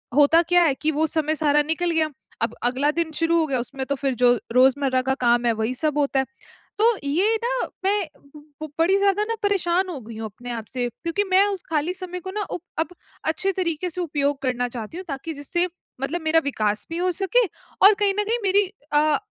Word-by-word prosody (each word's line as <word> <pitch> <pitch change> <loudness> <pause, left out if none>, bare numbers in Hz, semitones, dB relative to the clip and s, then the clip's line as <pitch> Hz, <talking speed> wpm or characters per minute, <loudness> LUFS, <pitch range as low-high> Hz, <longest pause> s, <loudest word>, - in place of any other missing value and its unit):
होता 295 +3 +6
क्या 355 -1 +5
है 295 -5 +3
कि 310 - +2
वो 310 +2 +1
समय 310 0 0
सारा 295 -1 +3
निकल 335 +3 0
गया, 315 -1 +1 0.3
अब - - 0
अगला 260 +4 +2
दिन 330 0 -1
शुरू 335 0 +2
हो 320 - +2
गया 265 -4 +1
उसमें 265 +2 -4
तो 280 - 0
फिर 270 -1 -1
जो 245 +1 +4 0.2
रोज़मर्रा 260 0 +3
का 265 +1 +1
काम 240 0 +3
है 235 - +4
वही 220 +3 -2
सब 300 +2 -1
होता 280 -2 +1
है। 265 - +1 0.5
तो 440 - +5 0.2
ये 390 +10 +2
ना - - -1 0.2
मैं 400 -1 +2 0.6
ब - - -4
बड़ी 370 +4 +4
ज़्यादा 400 +1 +2
ना 455 +1 -2
परेशान 375 -2 +1
हो 300 -6 -5
गयी 220 0 -10
हूँ 225 - -5
अपने 245 +4 -9
आप 225 -2 -5
से, 245 -1 -1
क्योंकि 335 - -2
मैं 385 +2 +6
उस 395 -3 -4
खाली 320 +3 0
समय 360 -1 -6
को 375 +2 -7
ना 420 +1 -2
उब 350 - -4 0.2
अब 325 - 0 0.4
अच्छे 355 +5 +1
तरीके 355 -2 -1
से 360 +2 -4
उपयोग 285 -3 -1
करना 245 -1 0
चाहती 235 +5 -7
हूँ 370 - -7
ताकि 275 +4 -4
जिससे 345 +5 -1 0.3
मतलब 320 +5 -2
मेरा 320 +1 +3
विकास 215 -6 -1
भी 330 - -4
हो 360 +1 +1
सके 410 +6 +2 0.4
और 410 +2 +10
कहीं 400 -1 +3
न 420 - +3
कहीं 455 +3 0
मेरी 395 +1 +3 0.3
अ, 295 0 +4
315 Hz, 225 wpm, -23 LUFS, 270-365 Hz, 0.6 s, और